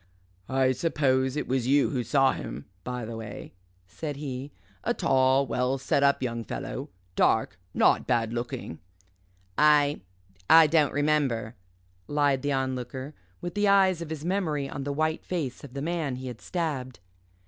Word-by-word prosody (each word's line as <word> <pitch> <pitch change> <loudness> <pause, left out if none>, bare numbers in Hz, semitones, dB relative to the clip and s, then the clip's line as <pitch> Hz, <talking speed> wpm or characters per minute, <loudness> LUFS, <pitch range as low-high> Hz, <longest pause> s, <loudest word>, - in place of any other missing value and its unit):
"I 130 0 +3
suppose 130 -2 +1
it - - -2
was 130 -2 0
you 140 +1 +3
who 125 -3 -1
saw 135 +3 +3
him, 70 - -6 0.2
by 125 -1 -4
the 115 +1 -6
way," 110 -2 -8 0.3
said 145 - -6
he, 140 -1 -5 0.3
"a - - 0
tall, 130 +1 +3
well 125 +2 0
set 135 +1 +1
up 140 -1 +3
young 115 -2 -2
fellow - - -5 0.3
dark - - +2 0.2
not - - +3
bad 115 -2 +1
looking." 120 - -5 0.8
"I 150 -1 +4 0.5
I 160 0 +9
don't 150 -2 +3
remember," 140 -6 0 0.5
lied 145 -2 +2
the 145 - -1
Onlooker, 130 +1 -3 0.3
with 175 0 -4
the 205 0 +1
eyes 190 -3 +4
of 165 - -6
his 160 -1 -5
memory 165 -7 0
on 135 0 -5
the 145 - -1
white 155 +2 -1
face 155 -9 -4
of 140 -2 -11
the 140 - -3
man 160 -5 -1
he 130 0 -6
had 120 -2 -9
stabbed. 145 -8 -3
135 Hz, 160 wpm, -27 LUFS, 125-150 Hz, 0.8 s, I